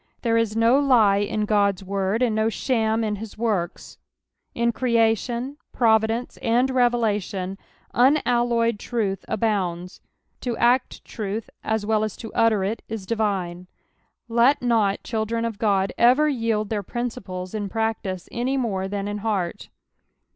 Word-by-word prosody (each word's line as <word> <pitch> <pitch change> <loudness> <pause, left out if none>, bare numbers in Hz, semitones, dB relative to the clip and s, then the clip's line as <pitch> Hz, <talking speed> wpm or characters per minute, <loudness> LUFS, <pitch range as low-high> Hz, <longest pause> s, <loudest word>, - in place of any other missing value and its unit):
There 230 -2 +2
is 230 -2 +1
no 230 +4 +4
lie 235 -8 +4
In 210 +1 -1
God's 200 -2 +1
word, 195 +4 -1
and 235 -3 +2
no 220 0 +2
shsm 225 -1 0
in 210 -1 -2
his 215 +1 -9
works; 210 -7 -2 0.6
in 235 0 +2
creation, 235 +2 0
providence, 225 +1 +1
and 245 +3 +1
revelation, 210 -6 0 0.3
unalloyed 240 -4 +2
truth 205 -5 -2
abounds. 185 -5 -2 0.4
To 240 -3 -3
act 250 +2 +1
truth 215 0 -5
as 220 -1 -1
wel! 215 0 +1
as 215 -2 -4
lo 225 - -7
utter 225 -4 +3
it 210 +4 -2
is 220 -3 -5
divine. 190 -5 -2 0.6
Let 235 +5 +4
not 220 -5 +1
children 230 0 -2
of 225 -3 -4
God 195 -3 +1
ever 255 +6 +5
yield 225 -6 0
their 215 -2 -1
principles 190 -5 -5
in 205 -2 -3
practice 220 -4 -2
any 255 +3 -1
more 195 -7 -1
than 200 0 -3
in 205 0 -3
heart. 200 -5 -2
220 Hz, 140 wpm, -23 LUFS, 200-235 Hz, 0.6 s, ever